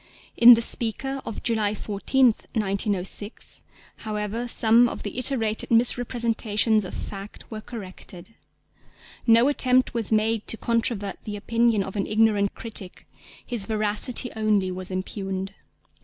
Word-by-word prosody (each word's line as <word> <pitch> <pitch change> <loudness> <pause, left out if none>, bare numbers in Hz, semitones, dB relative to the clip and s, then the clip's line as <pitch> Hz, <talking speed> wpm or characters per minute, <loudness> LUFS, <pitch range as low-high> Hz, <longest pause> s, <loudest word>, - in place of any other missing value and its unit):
In 240 +1 +9
the 230 - +1
Speaker 265 +5 -2
of 225 - -6
July 215 -3 0
14th, 220 +4 0
1906, 200 0 -3 0.4
however, 215 +2 -4
some 235 +1 +5
of - - -7
the 205 - -6
iterated 225 -4 +1
misrepresentations 230 -2 +1
of 180 - -7
fact 200 0 -8
were 215 -1 -6
corrected. 190 -3 -10 0.9
No 230 +2 +6
attempt 255 -3 +3
was 230 -2 -1
made 220 0 0
to 225 - +2
controvert 230 -4 -2
the 210 - -5
opinion 230 0 +1
of 190 - -8
an 200 - -2
ignorant 210 -2 +1
critic: 210 -5 -5 0.4
his 235 -5 -2
veracity 215 +3 -1
only 210 -4 +1
was 185 0 -5
impugned. 190 0 -4
220 Hz, 125 wpm, -24 LUFS, 205-235 Hz, 0.9 s, In